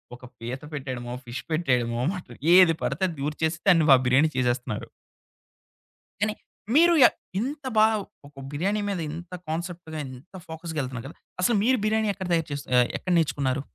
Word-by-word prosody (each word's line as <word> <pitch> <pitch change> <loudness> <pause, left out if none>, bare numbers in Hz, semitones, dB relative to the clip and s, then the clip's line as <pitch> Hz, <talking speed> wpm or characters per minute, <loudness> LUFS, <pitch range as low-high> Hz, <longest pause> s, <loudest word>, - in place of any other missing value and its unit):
ఒక 125 - -18 0.2
పీత 120 +3 -5
పెట్టేయడమో, 130 -4 -5
ఫిష్ 120 +2 -5
పెట్టేయడమో, 125 -7 +1 0.5
ఏది 180 -3 +7
పడితే 190 - -1
అది 165 - -7
దురచేసి 160 +3 -1
దాన్ని 165 -4 +5
వ 135 - +11
బిర్యానీ 145 +5 +4
చేసేస్తున్నారు. 120 -3 -1 1.3
కానీ 210 0 +1 0.4
మీరు 340 +3 +6
య - - +11 0.3
ఇంత 280 +5 -4
బా 215 - +7 0.4
ఒక 140 -1 -13
బిర్యానీ 195 +8 -1
మీద 195 -3 -2
ఇంత 170 +3 -8 0.2
కాన్సెప్ట్‌గా 170 -1 -5
ఇంత 130 +9 -13
ఫోకస్‌‌గా 160 -1 -5
ఎళ్తున్నారు 125 -2 -6
గదా. 155 - -12 0.2
అసలు 225 +5 +3
మీరు 255 +3 +3
బిర్యానీ 220 0 +1
ఎక్కడ 190 -2 -6
తయారు 165 -2 +1
చెస్ 140 -1 -4
ఆహ్, 125 -1 +5
ఎక్కడ 185 - -4
నేర్చుకున్నారు? 140 -4 0
160 Hz, 155 wpm, -25 LUFS, 130-185 Hz, 1.3 s, వ